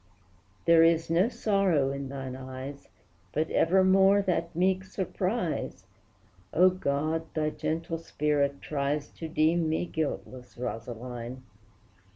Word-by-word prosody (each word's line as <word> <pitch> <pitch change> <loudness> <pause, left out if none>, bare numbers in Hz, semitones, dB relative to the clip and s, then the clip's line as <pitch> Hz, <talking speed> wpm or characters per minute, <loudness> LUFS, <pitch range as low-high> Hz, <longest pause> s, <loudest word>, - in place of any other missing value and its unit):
There 170 -1 +7
is 165 0 +3
no 180 +7 +4
sorrow 195 - +2
in 140 -1 -5
thine 135 -2 -5
eyes, 130 +2 -8 0.5
But 155 +2 0
evermore 190 +3 +4
that 170 -3 -1
meek 185 +2 +2
surprise, 185 - -2 0.7
O, 185 +3 +5
God! 160 -1 -1
thy 155 -1 +1
gentle 165 +2 -3
spirit 145 -3 0
tries 145 0 -1
To 165 - -7
deem 160 +1 +2
me 160 +2 0
guiltless, 140 -6 -4
Rosaline! 120 +1 -6
160 Hz, 115 wpm, -28 LUFS, 140-180 Hz, 0.7 s, There